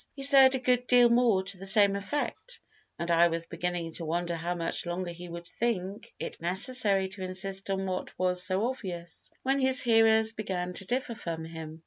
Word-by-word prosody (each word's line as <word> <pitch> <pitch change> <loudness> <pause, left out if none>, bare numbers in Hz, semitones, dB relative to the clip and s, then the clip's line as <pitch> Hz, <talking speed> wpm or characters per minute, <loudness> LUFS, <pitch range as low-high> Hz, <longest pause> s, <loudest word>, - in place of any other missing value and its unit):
He 275 - -6
said 270 -1 +8
a - - -2
good 250 0 0
deal 245 -1 +6
more 235 -5 +3
to 195 0 -2
the 195 - -6
same 200 -1 +5
effect, 290 - -4 0.4
and 170 0 -3
I 170 +1 +5
was 165 0 -2
beginning 175 -1 -4
to 170 - -4
wonder 170 +2 -2
how 170 +2 -3
much 170 +1 -3
longer 175 0 -3
he 175 +1 -10
would 170 0 -8
think 200 0 -3
it - - -7
necessary 195 +2 +2
to 190 0 -9
insist 190 +1 -3
on 195 0 -1
what 185 -1 -5
was 180 0 0
so 185 +3 0
obvious, 180 -9 -6
when 270 +1 +1
his 260 -1 +3
hearers 225 -1 +3
began 180 -4 -4
to 190 - 0
differ 245 -1 -2
from 165 -6 -6
him. 160 -1 -9
190 Hz, 195 wpm, -28 LUFS, 175-235 Hz, 0.4 s, said